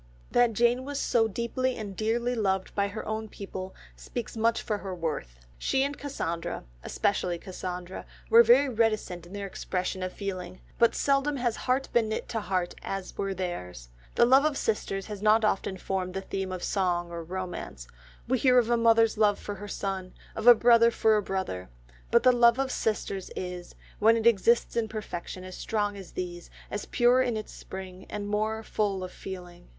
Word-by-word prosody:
That 245 -1 +4
Jane 240 +3 +3
was 285 +1 -4
so 230 -3 +2
deeply 240 +4 -1
and 205 -4 -6
dearly 235 +4 0
loved 190 -5 0
by 200 -1 +1
her 205 +2 -6
own 220 0 -3
people 190 -2 -7 0.2
speaks 240 -2 -6
much 230 +1 +1
for 210 -2 -2
her 190 -2 -5
worth. 150 - -4 0.2
She 265 - +1
and 285 +1 -2
Cassandra, 170 - -4 0.2
especially 180 -3 0
Cassandra, 180 0 -6 0.2
were 230 - +8
very 245 +5 +6
reticent 215 -7 0
in 180 - -13
their 200 0 -4
expression 185 -1 -3
of 185 0 -2
feeling, 185 -2 -5 0.2
but 235 -1 +4
seldom 280 +1 +1
has 240 -3 0
heart 260 +1 0
been 225 -2 +3
knit 220 - -3
to 225 - -1
heart 185 -3 -1
as 195 -1 -5
were 195 -1 -2
theirs. 90 - -5 0.3
The 235 - +6
love 265 +3 +6
of 305 -2 +1
sisters 195 -3 -1
has 210 -2 -7
not 215 +1 +4
often 195 -2 0
formed 185 0 -3
the 195 - -2
theme 190 -1 -4
of 185 -1 -5
song 175 -3 0
or 170 -1 -5
romance; 175 - -6 0.4
we 255 +1 +1
hear 255 0 +5
of 240 -1 +3
a 240 - +4
mother's 225 -1 +4
love 205 -2 +4
for 205 - -6
her 205 +1 -8
son, 195 -2 -4 0.2
of 220 +2 -3
a 245 - +11
brother 235 0 +6
for 220 -1 +3
a 210 - +2
brother, 190 - -4 0.4
but - - +4
the 255 - +7
love 235 -1 +5
of 270 -1 0
sisters 200 -3 -2
is, 180 -1 -6 0.2
when 225 +2 +5
it 225 - -2
exists 235 +1 +4
in 230 -2 +1
perfection, 185 -4 -6
as 185 0 -8
strong 205 -2 -1
as 195 -3 -10
these, 175 -1 -5 0.2
as 205 - -4
pure 245 +1 +4
in 245 -3 0
its 215 - -7
spring, 190 -1 -9
and 205 -1 -4
more 215 +2 -1
full 200 -4 -1
of 180 - -6
feeling. 180 - -9
205 Hz, 190 wpm, -28 LUFS, 185-235 Hz, 0.4 s, a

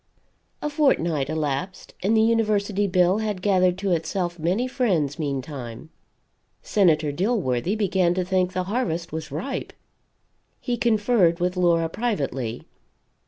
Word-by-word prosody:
A 300 - 0
fortnight 170 - +1
elapsed, 155 +3 -3
and 215 +4 +2
the 220 - +5
University 210 -3 +1
bill 180 +1 +3
had 210 -4 -3
gathered 185 -3 +3
to 195 -1 -1
itself 175 +1 -1
many 185 +10 0
friends, 185 - 0
meantime. 140 -2 -5 0.7
Senator 160 -7 +2
Dilworthy 180 - 0
began 190 -4 +1
to 185 -1 -1
think 185 0 0
the 185 - -1
harvest 185 -5 -2
was 160 0 -5
ripe. 180 - -4 0.9
He 245 - -2
conferred 215 -6 +2
with 180 +1 0
Laura 170 -2 +2
privately. 140 - -3
180 Hz, 125 wpm, -24 LUFS, 160-210 Hz, 0.9 s, the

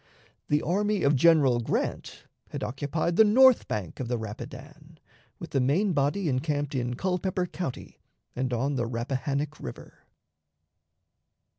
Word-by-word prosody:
The 150 0 +1
army 205 +3 0
of 140 +1 +4
General 140 -4 +4
Grant 115 - -3 0.3
had - - -5
occupied 150 +6 -2
the 220 - +8
north 255 +4 +5
bank 100 -6 -4
of 130 - -3
the 120 0 -1
Rapidan, 145 +8 -9 0.4
with 170 - -9
the 135 - +1
main 175 +10 +2
body 150 +6 0
encamped 145 +1 -1
in 125 -2 -2
Culpeper 185 +3 -1
County 175 -6 -6 0.4
and 130 0 -2
on 135 +4 -1
the 120 -2 -1
Rappahannock 135 +5 -3
River. 60 - -9
145 Hz, 135 wpm, -27 LUFS, 125-170 Hz, 0.4 s, the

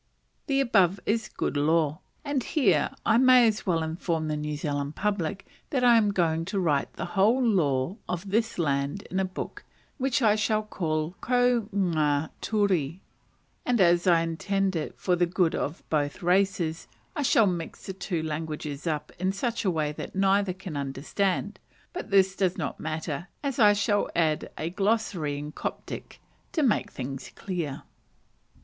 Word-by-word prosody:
The 275 -2 +2
above 195 -7 +3
is 220 0 0
good - - -3
law: 155 +1 +2 0.3
and 285 -2 0
here 200 - +2 0.2
I 225 +1 +4
may 255 -2 +7
as 215 -1 -1
well 165 -3 +2
inform 160 -1 -2
the 150 - 0
New 150 0 -3
Zealand 145 0 -3
public 195 -3 -2 0.2
that 260 -4 0
I 240 -1 +7
am 215 -2 +4
going 165 -4 +1
to 195 +2 -2
write 150 -6 +1
the 175 - -4
whole 215 +6 +4
law 170 - +1
of 180 +2 -4
this 225 +2 +1
land 140 +2 0
in 190 - 0
a 190 - +2
book, 185 - -6 0.4
which 265 -1 +1
I 210 -1 +5
shall 215 0 +1
call 160 -4 -2
"Ko 245 -3 +2
nga 155 -6 +1
ture;" 190 -9 +1 0.7
and 245 -2 +1
as 175 -1 +4
I 170 -2 +5
intend 190 +4 -1
it 155 - -4
for 180 - +1
the 175 0 +2
good 175 -1 +1
of 150 +4 -3
both 145 +1 -1
races, 180 -3 +1 0.3
I 295 - -1
shall 230 -5 +4
mix 175 -4 -3
the 190 - -4
two 180 -3 -3
languages 155 -1 -4
up 155 -2 -2
in 185 +1 +1
such 230 +5 -2
a - - +4
way 155 -4 0
that 150 - -7
neither 195 0 +3
can 185 -3 -8
understand; 155 +9 -2 0.3
but 360 - -6
this 190 -1 +4
does 185 -2 0
not 155 -6 -4
matter, 155 +1 -4 0.2
as 275 -3 -2
I 210 -2 +7
shall 205 0 +1
add 160 -2 +1
a 160 +2 -3
"glossary," 195 -7 0
in 150 +1 -6
Coptic, - - -6 0.3
to 315 - +1
make 240 -6 +2
things 130 -1 -6
clear. 170 -8 -4
180 Hz, 170 wpm, -27 LUFS, 155-205 Hz, 0.7 s, may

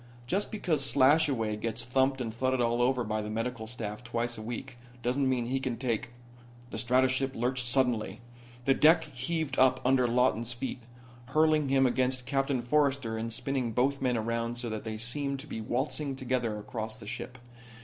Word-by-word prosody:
Just 195 +11 -1
because 170 -9 0
Slashaway 135 -5 +3
gets 115 +1 -3
thumped 130 +2 +2
and 115 -3 -3
thudded 130 +2 0
all 120 0 +2
over 125 0 +2
by 110 -1 -2
the 105 - -5
medical 115 +1 -3
staff 110 -1 -6
twice 120 0 -2
a 110 - -7
week 120 +3 -6 0.2
doesn't 130 +2 +1
mean 125 -2 0
he 130 +3 -1
can 130 -3 -3
take 120 -1 -2 0.3
" 120 0 -22
The - - -4
stratoship 130 +2 +2
lurched 125 +1 0
suddenly. 125 -3 +1 0.5
The 135 - +5
deck 160 +4 +5
heaved 145 +1 -3
up 130 0 +5
under 130 -1 +4
Lawton's 120 -1 +2
feet, 125 +1 -5 0.5
hurling 155 +1 +3
him 135 0 +4
against 125 0 +1
Captain 135 -1 0
Forrester 135 -3 +1
and 115 +1 -3
spinning 125 0 -2
both 135 +4 +1
men 125 -2 +1
around 115 +1 -1
so 120 -1 -3
that 110 0 -5
they 110 -1 -4
seemed 140 +5 -2
to - - -10
be 110 -6 -5
waltzing 135 +4 -1
together 125 -4 -1
across 110 +1 -5
the 110 - -11
ship. 125 +3 -6
125 Hz, 180 wpm, -30 LUFS, 115-135 Hz, 0.5 s, The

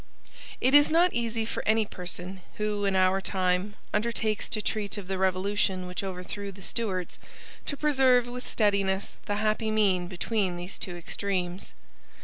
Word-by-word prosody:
It 260 - +3
is 290 0 +8
not 345 +3 +4
easy 230 -1 0
for - - -3
any 220 0 +4
person 180 0 -7
who, 210 -1 -1
in 195 -1 +2
our 185 +1 +4
time, 185 +1 0 0.2
undertakes 220 -1 0
to 215 - -1
treat 210 -1 -2
of 200 -3 -6
the 190 -1 -2
revolution 190 0 +1
which 180 +2 -4
overthrew 195 +2 -5
the 195 0 -13
Stuarts, 190 -6 -3 0.5
to 285 - -2
preserve 265 -5 +4
with 250 +1 -7
steadiness 200 -2 +1
the 205 - 0
happy 215 +1 +1
mean 195 -5 +2
between 190 +1 -1
these 175 +2 -6
two 175 -2 -5
extremes. 180 +1 -3
200 Hz, 155 wpm, -28 LUFS, 185-220 Hz, 0.5 s, is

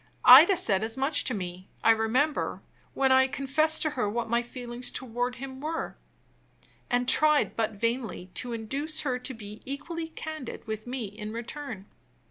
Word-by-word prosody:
Ida 315 +10 +10
said 205 - +2
as 225 +3 -2
much 280 +2 +1
to 255 - 0
me, 185 -1 -6
I 225 - +7
remember, 235 +7 0 0.3
when 265 -1 +3
I 260 0 +6
confessed 300 +4 +2
to 310 - 0
her 250 -7 -1
what 235 +2 -2
my 235 +1 +2
feelings 245 0 -5
toward 245 0 -3
him 265 +1 -8
were, 320 +2 -3 0.9
and 245 0 +1
tried 305 +1 +3
(but 225 -1 0
vainly) 230 -3 -2
to 245 - -4
induce 275 +8 -2
her 255 -4 -1
to 260 +1 -6
be 210 -1 -10
equally 320 +5 -5
candid 315 -4 -7
with 220 +1 -5
me 250 0 -3
in 210 +1 -7
return. 235 -3 -6
250 Hz, 165 wpm, -28 LUFS, 225-285 Hz, 0.9 s, Ida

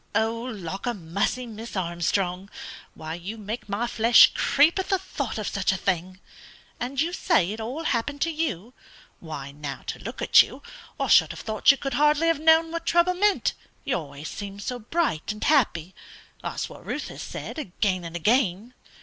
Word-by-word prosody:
"Lawk 220 -4 -2
a 240 - 0
mussy, 200 +8 -2
Miss 225 0 -8
Armstrong, 180 +1 -1 0.5
why 160 0 -6
you 180 +6 -6
make 215 +1 -6
my 205 +4 -1
flesh 230 0 +6
creep 305 +6 +3
at 380 - -3
the 385 - +3
thought 280 -11 -5
of 215 - -3
such 200 -2 0
a 190 - -1
thing? 185 0 -2 0.6
And 255 +2 -3
you 335 +4 +1
say 265 - +2
it 220 - -6
all 255 +9 -4
happened 285 +1 -1
to 330 - +1
you? 250 - -3 0.5
Why, 145 -4 -7
now, 140 -1 -7
to - - -5
look - - -7
at - - +7
you, - - -6 0.4
I - - +1
should - - +6
have - - -7
thought 220 -1 +1
you 275 - +8
could 275 -1 -4
hardly 300 +4 +3
have 330 -3 +2
known 320 +1 +5
what 335 0 -5
trouble 345 +1 +4
meant, 405 +2 +2 0.3
you 275 - 0
always 145 -2 -6
seem 200 -1 -7
so 245 +4 -4
bright 235 - -1
and 215 - -6
happy; 190 - +2 0.5
that's - - -3
what - - -13
Ruth - - -4
has - - -8
said, - - -6
again 185 - -1
and 170 0 -7
again." 215 +3 +1
220 Hz, 185 wpm, -25 LUFS, 185-285 Hz, 0.6 s, you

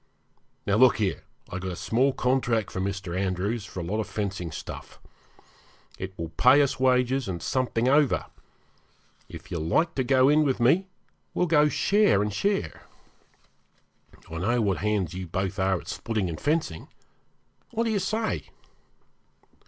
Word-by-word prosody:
Now, 100 +1 +2
look 130 +1 +6
here, 100 -4 -1 0.3
I've 95 - -4
got 95 -1 -4
a - - -6
small 125 +9 +1
contract 125 -4 0
from 95 0 -2
Mr. 95 -3 -4
Andrews 95 +3 -1
for 95 - -7
a - - -4
lot 100 +6 -2
of 110 - -2
fencing 95 -5 -3
stuff. 80 - -8 1.0
It 95 0 -6
will 80 -1 -4
pay 130 - +5
us 135 - -2
wages 130 0 +2
and 90 -3 -3
something 125 +5 0
over. 145 0 +3 1.0
If 85 +3 -11
you 85 - -2
like 160 - +1
to 130 - 0
go 130 +1 +4
in 150 +2 +5
with 135 -4 0
me, 165 +11 +3 0.5
we'll 180 - +2
go 150 -3 +4
share 200 - +3
and 105 -1 -3
share. 200 - -1 1.5
I 80 - -6
know 120 +7 +1
what 100 -5 +1
hands 105 -5 -1
you 90 0 -5
both 95 +3 -3
are 95 -1 +1
at 85 - -14
splitting 105 -1 -2
and 80 - -6
fencing. 150 - -1 0.8
What 230 - -1
do 230 - 0
you 210 - +1
say?' 220 +4 -2
110 Hz, 160 wpm, -26 LUFS, 95-135 Hz, 1.5 s, look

